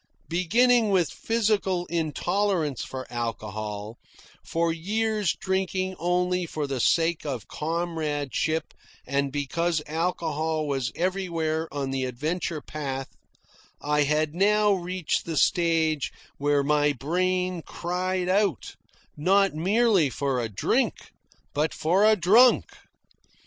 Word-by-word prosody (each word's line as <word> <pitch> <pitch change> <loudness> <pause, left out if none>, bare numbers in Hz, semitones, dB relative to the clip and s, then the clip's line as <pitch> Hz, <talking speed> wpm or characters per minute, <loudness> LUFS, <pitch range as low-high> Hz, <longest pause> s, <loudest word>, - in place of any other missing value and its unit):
Beginning 225 +7 +3
with 180 -9 +2
physical 205 - 0
intolerance 165 - -1
for 130 -1 -6
alcohol, 110 -2 -4 0.4
for 165 0 0
years 210 +1 0
drinking 190 -1 -1
only 180 +1 0
for 155 -2 -3
the 135 -2 -3
sake 165 +6 +2
of 130 -8 -4
comradeship 160 -2 -2 0.3
and 140 +1 0
because 160 +4 -1
alcohol 160 -1 -1
was 135 -3 -1
everywhere 165 -4 -1
on 140 -1 -3
the 135 -1 -1
adventure 155 +5 -3
path, 135 -3 -5 0.7
I 150 0 +1
had 150 +1 +1
now 210 +3 +3
reached 180 -2 -2
the 165 -2 -3
stage 165 -4 +2 0.3
where 145 0 +2
my 145 0 +2
brain 180 +5 -1
cried 180 +2 -2
out, 190 - 0 0.4
not 195 +5 +3
merely 190 - +3
for 135 -1 -1
a 115 - -3
drink, 100 - -1 0.4
but 150 +2 0
for 185 +6 +3
a 215 0 +6
drunk. 215 +7 +5
165 Hz, 115 wpm, -26 LUFS, 145-185 Hz, 0.7 s, a